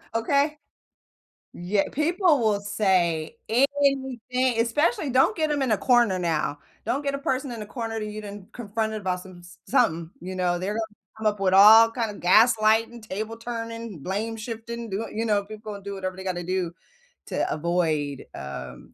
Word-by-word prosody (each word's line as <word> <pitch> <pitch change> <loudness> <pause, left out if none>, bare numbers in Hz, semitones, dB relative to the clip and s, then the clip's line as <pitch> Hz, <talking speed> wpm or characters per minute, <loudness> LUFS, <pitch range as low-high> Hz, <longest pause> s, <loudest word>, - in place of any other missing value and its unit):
Okay? 280 +6 +1 1.0
Ye 195 +3 0
people 330 0 +2
will 210 -3 +1
say 185 -4 +1
anything, 260 -2 +1
especially 295 - +1
don't 265 - +3
get 310 -2 0
'em 285 -2 0
in 255 -4 +1
a - - +1
corner 240 -4 +3
now. 160 -4 -1 0.3
Don't 280 +3 -1
get 280 0 -1
a - - -1
person 270 -2 -2
in 225 -2 -6
a - - -5
corner 225 -1 -4
that 215 - -4
you 210 0 -6
didn't 205 +1 -10
confronted 220 -2 -3
about 180 -1 -1
some 185 -2 -13
s 175 +1 -15
something, 170 -11 +2
you 185 +1 -6
know? 175 -1 +1
They're 190 +4 -2
gonna 220 -2 -5 0.2
come 220 -1 0
up 205 -1 0
with 185 -1 +2
all 220 +3 +9
kinda 220 -6 -4
gaslighting, 225 +2 +4
table 215 +2 -5
turning, 230 -4 -6
blame-shifting, 225 - -4
do 195 +2 -2
what 225 - -6
you 225 +2 -1
know? 205 -2 +2
People 215 0 -8
will 200 - -8
do 200 0 -6
whatever 185 -1 -4
they 190 - -8
gotta 180 -2 -3
do, 180 -1 -2 0.5
to - - -1
avoid, 155 -4 -1
um, 65 -2 -8
215 Hz, 175 wpm, -25 LUFS, 185-240 Hz, 1.0 s, all